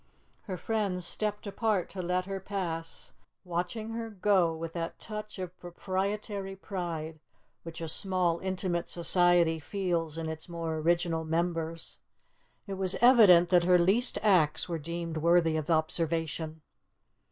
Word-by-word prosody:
Her 185 -4 -4
friends 195 -3 -2
stepped 210 +3 -3
apart 205 -2 0
to 190 - -5
let 180 +1 -1
her 195 0 -4
pass, 175 -4 -5 0.3
watching 180 +5 -3
her 225 0 -4
go 190 -4 +2
with 165 0 -6
that 165 -1 -4
touch 215 -1 -7
of 185 -1 -6
proprietary 195 +2 -3
pride 170 -5 -5 0.4
which 165 0 -8
a 165 - -3
small 180 0 0
intimate 185 -2 -2
society 175 -1 +3
feels 170 -2 -2
in 165 -1 -3
its 160 +2 -6
more 165 -2 -3
original 165 0 +1
members. 165 0 -2 0.7
It 195 -2 -6
was 185 -1 +1
evident 210 -9 +7
that 175 -2 +4
her 180 0 +6
least 195 +8 +3
acts 180 -8 +3
were 170 -2 -3
deemed 165 +1 -4
worthy 165 0 +3
of 155 0 -3
observation. 160 -1 0
175 Hz, 140 wpm, -30 LUFS, 165-195 Hz, 0.7 s, evident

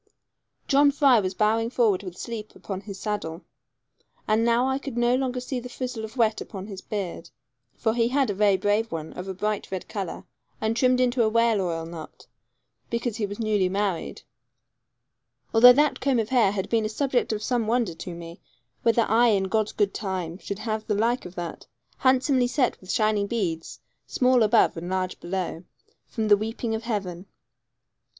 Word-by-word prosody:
John 285 +1 +5
Fry 275 -4 +5
was 190 -2 -2
bowing 225 +2 +2
forward 225 -7 +2
with 180 -3 -8
sleep 225 -3 -6
upon 195 -2 -6
his 200 -2 -9
saddle, 190 -5 -4 0.8
and 215 +1 +3
now 235 +2 +3
I 265 +1 0
could 275 -4 -7
no 240 +1 +3
longer 255 -1 0
see 255 +1 -4
the 250 +1 -8
frizzle 250 -2 -5
of 220 +3 -8
wet 220 -2 +2
upon 195 -2 -7
his 195 -3 -8
beard 180 -5 -5 0.5
for 220 -2 0
he 230 -1 +2
had 265 -2 +1
a - - -2
very 200 -1 +3
brave 205 +4 0
one, 160 -1 -5
of 180 - -7
a 190 - -4
bright 210 +2 -2
red 190 -1 -5
colour, 195 -5 -5 0.3
and 220 +1 0
trimmed 255 +1 +3
into 250 0 +2
a 220 - +3
whale 230 -2 +3
oil 165 -3 -2
knot, 165 -1 -10 0.6
because 235 -1 -2
he 210 -3 -1
was 205 +1 -7
newly 210 -4 +1
married 195 -3 -2 1.3
although 240 +2 +9
that 295 +3 +2
comb 265 -1 +1
of 225 -1 -1
hair 240 -7 +4
had 195 -1 -3
been 225 -1 +1
a 215 - -1
subject 255 +1 0
of 215 -1 -3
some 240 -3 0
wonder 230 -6 +1
to 170 +1 -7
me, 170 0 -10 0.4
whether 230 0 +3
I, 230 +3 +4
in 200 -4 +3
God's 215 +2 0
good 205 -2 0
time, 185 -4 -4
should 200 - -5
have 215 0 -3
the 210 - +1
like 230 +1 0
of 180 - -14
that, 175 -2 -6 0.3
handsomely 260 -1 +3
set 255 0 0
with 185 - -15
shining 215 -3 +1
beads, 185 -8 -3 0.3
small 255 -1 +3
above 220 +1 +4
and 175 +2 -5
large 185 -1 -2
below, 175 -1 -4 0.4
from 220 -3 -2
the 205 -1 +6
weeping 225 +2 -3
of 220 - -2
the 230 - -12
heaven. 195 -5 -3
215 Hz, 190 wpm, -25 LUFS, 190-240 Hz, 1.3 s, although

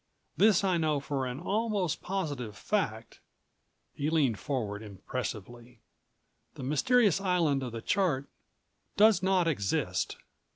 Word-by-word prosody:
This 210 -2 +4
I 185 -3 +2
know 155 -3 +1
for 135 -2 -2
an 125 +2 -5
almost 200 -2 -1
positive 145 - -3
fact," 115 - -2 0.7
he 145 +2 -2
leaned 140 - +2
forward 105 -6 -3
impressively: 115 +3 -6 0.8
"The - - -7
mysterious 195 - +3
island 170 -7 +2
of 125 -2 -4
the 115 0 -6
chart 160 -9 +1 0.7
does 210 -3 +6
not 190 -2 +2
exist." 100 -12 -1
145 Hz, 120 wpm, -30 LUFS, 120-190 Hz, 0.8 s, does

